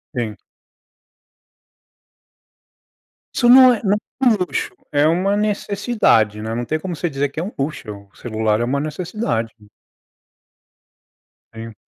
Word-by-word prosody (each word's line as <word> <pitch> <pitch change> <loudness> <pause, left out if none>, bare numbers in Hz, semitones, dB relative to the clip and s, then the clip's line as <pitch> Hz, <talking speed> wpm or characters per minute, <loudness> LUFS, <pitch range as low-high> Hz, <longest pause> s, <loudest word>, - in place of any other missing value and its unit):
Sim. 115 -4 -3 3.0
Isso 240 - +3
não 255 0 +9
é 225 - -4
não 205 0 +2 0.3
é - - +4
um 230 - +5
luxo, 415 - -2 0.2
é 145 +1 +3
uma 185 +5 +1
necessidade, 200 - +1
né, 110 +1 -4
não 120 +1 -3
tem 155 +5 -2
como 175 +1 -5
você 175 +3 -2
dizer 140 -1 -1
que 145 - -6
é - - -2
um 200 - -5
luxo, 105 -8 -5
o - - -31
celular 110 -2 -1
é - - 0
uma 130 +4 0
necessidade. 155 - -3 2.0
Sim. 115 0 -8
155 Hz, 135 wpm, -20 LUFS, -, 3.0 s, não